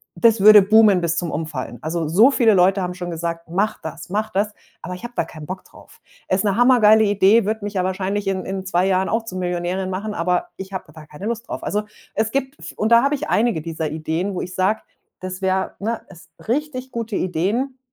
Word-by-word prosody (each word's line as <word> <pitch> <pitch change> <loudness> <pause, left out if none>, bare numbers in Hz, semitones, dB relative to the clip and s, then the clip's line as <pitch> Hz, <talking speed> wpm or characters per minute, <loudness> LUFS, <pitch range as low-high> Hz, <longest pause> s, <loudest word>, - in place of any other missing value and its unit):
Das 230 -2 +4
würde 210 +1 +9
boomen 210 -2 +5
bis 170 0 -1
zum 175 -1 -1
Umfallen. 145 -6 -4
Also, 160 0 -2
so 210 - +5
viele 230 -5 +4
Leute 190 +1 +4
haben 180 -1 -3
schon 175 -1 -6
gesagt: 165 0 -4
„Mach 200 +5 -1
das, 160 +1 -8
mach 215 +3 -1
das,“ 205 +2 0 0.3
aber 180 - -6
ich 180 - -12
habe 240 0 -7
da - - +1
keinen 155 -2 -10
Bock 185 +3 -7
drauf. - - -18 0.3
Ist 190 +2 +1
'ne 200 -2 +2
hammergeile 225 -3 +6
Idee, 205 +1 +4
würde 215 0 -2
mich 205 - -5
ja 185 -2 0
wahrscheinlich 190 +2 -2
in 190 -1 -1
in 190 0 -4
2 185 0 +1
Jahren 190 0 +1
auch 225 0 -1
zu 185 -4 -7
Millionärin 180 +1 -2
machen, 200 +3 -4
aber 180 -1 0
ich 190 0 -8
habe 190 - -7
da 155 -2 -12
keine 150 +6 -10
Lust 235 +2 -4
drauf. - - -5
Also 210 +1 -1 0.3
es 220 0 0
gibt 270 +1 -3
v - - -8
und 215 - 0
da 235 - +6
habe 280 +1 +2
ich 300 +2 -5
einige 220 -7 +1
dieser 160 -1 -4
Ideen, 160 +5 -2
wo - - -3
ich 180 - -7
sage, 195 +4 +1 0.4
das 185 +1 -6
wär 190 0 0
ne, 225 +2 -2
es 175 -2 -15 0.2
richtig 260 0 -2
gute 230 -3 -4
Ideen, 210 - -1
190 Hz, 230 wpm, -21 LUFS, 180-220 Hz, 0.4 s, würde